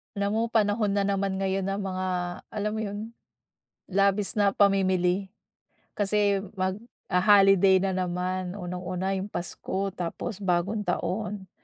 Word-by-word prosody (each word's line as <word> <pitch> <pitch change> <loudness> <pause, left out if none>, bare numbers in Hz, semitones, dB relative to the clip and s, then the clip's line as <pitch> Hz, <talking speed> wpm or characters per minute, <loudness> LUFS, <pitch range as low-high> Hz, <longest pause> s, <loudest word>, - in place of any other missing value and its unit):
Alam 200 +1 0
mo, 225 - +2
panahon 210 -1 +2
na 200 0 +1
naman 195 -1 0
ngayon 195 0 0
ng 195 - -2
mga, 185 0 -2 0.4
alam 210 0 -2
mo - - -2
'yon, 215 +3 -6 0.7
labis 200 +1 +1
na 205 -2 +3
pamimili. 190 -1 +2 0.7
Kasi, 205 -1 +1
magho-holiday 195 -1 +3
na 195 0 0
naman, 180 +1 -2
unang-una 185 0 -3
'yong 195 +2 -5
pasko 190 +2 -3
tapos 180 +4 -5
bagong 195 +2 0
taon, 190 +1 -2
195 Hz, 125 wpm, -27 LUFS, 185-205 Hz, 0.7 s, na